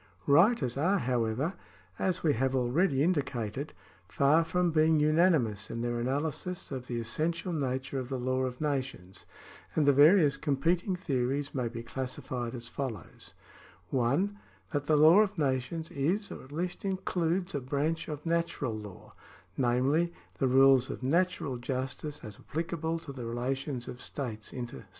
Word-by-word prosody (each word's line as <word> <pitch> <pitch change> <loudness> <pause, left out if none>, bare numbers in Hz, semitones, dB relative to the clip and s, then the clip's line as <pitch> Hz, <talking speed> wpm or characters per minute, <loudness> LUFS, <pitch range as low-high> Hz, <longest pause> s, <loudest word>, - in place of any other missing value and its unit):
Writers 145 - +4
are, 185 +8 +3
however, 125 - 0 0.5
as 185 -1 0
we 155 -3 +4
have 130 +2 0
already 135 +4 +2
indicated, 140 - -1 0.3
far 145 - +4
from 175 +1 +1
being 155 0 +4
unanimous 150 - +2
in 115 - -4
their 120 0 -1
analysis 145 +9 -2
of 130 -2 -5
the 120 -1 -2
essential 165 - -1
nature 130 -2 -2
of 130 -1 -5
the 135 - -2
law 130 +1 -1
of 125 -1 -3
nations, 135 -11 -3 0.5
and 155 - +3
the 140 - +6
various 150 +1 +6
competing 165 +6 0
theories 140 -4 -1
may 125 -3 -1
be 115 0 -6
classified 125 -1 -4
as 120 -1 -5
follows: 120 - -6 0.3
— 95 -1 -25
(1) 145 +12 +1 0.3
That 145 -3 -1
the 155 - +4
law 160 +6 +8
of 210 -2 +2
nations 145 +3 -1
is, 180 +10 -1
or - - -8
at 130 - -15
least 175 +4 -3
includes, 185 -1 -1
a 145 - 0
branch 150 +5 -1
of 150 0 -6
natural 165 -7 -1
law, 105 -3 -10 0.4
namely, 135 +7 +2 0.3
the 135 - +3
rules 135 0 +5
of - - -6
natural 165 -2 +1
justice 130 +4 -4
as 105 -2 -9
applic 165 +3 -4
able 165 0 -1
to 160 -4 -8
the 125 -3 -6
relations 125 +2 -3
of 125 - -7
states 110 -7 -5
inter 120 - -6
se. - - -14
140 Hz, 160 wpm, -30 LUFS, 125-165 Hz, 0.5 s, law